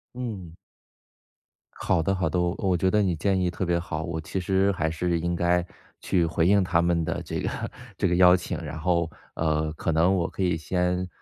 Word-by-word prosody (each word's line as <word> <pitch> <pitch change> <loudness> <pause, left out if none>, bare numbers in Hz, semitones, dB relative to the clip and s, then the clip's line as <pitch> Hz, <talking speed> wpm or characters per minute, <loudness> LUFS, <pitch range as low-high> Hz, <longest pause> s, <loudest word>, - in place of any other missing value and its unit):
嗯。 100 -10 -6 1.2
好 90 -3 0
的 95 +4 0
好 95 -1 0
的， 90 - 0
我 90 +1 0
我 95 -3 +1
觉 95 +3 +2
得 105 - +3
你 95 -4 +1
建 95 +4 +1
议 90 -1 +1
特 90 +2 -3
别 85 0 +1
好。 80 -3 -4
我 80 0 -4
其 80 +4 -4
实 95 +2 +2
还 80 -3 -1
是 85 +1 -1
应 85 +1 -1
该 85 0 +1 0.4
去 85 -2 +1
回 80 0 0
应 100 0 +4
他 90 -2 +2
们 85 -1 +1
的 - - -2
这 - - -4
个 - - -2 0.5
这 - - +1
个 90 - +1
邀 90 0 +7
请， 90 - -4
然 80 -2 -6
后， 85 -1 +1 0.3
呃， 80 -1 0
可 80 - -2
能 85 +4 +3
我 90 -3 0
可 95 - -3
以 90 -3 +1
先， 90 +3 -1
90 Hz, 230 characters per minute, -26 LUFS, 80-95 Hz, 1.2 s, 邀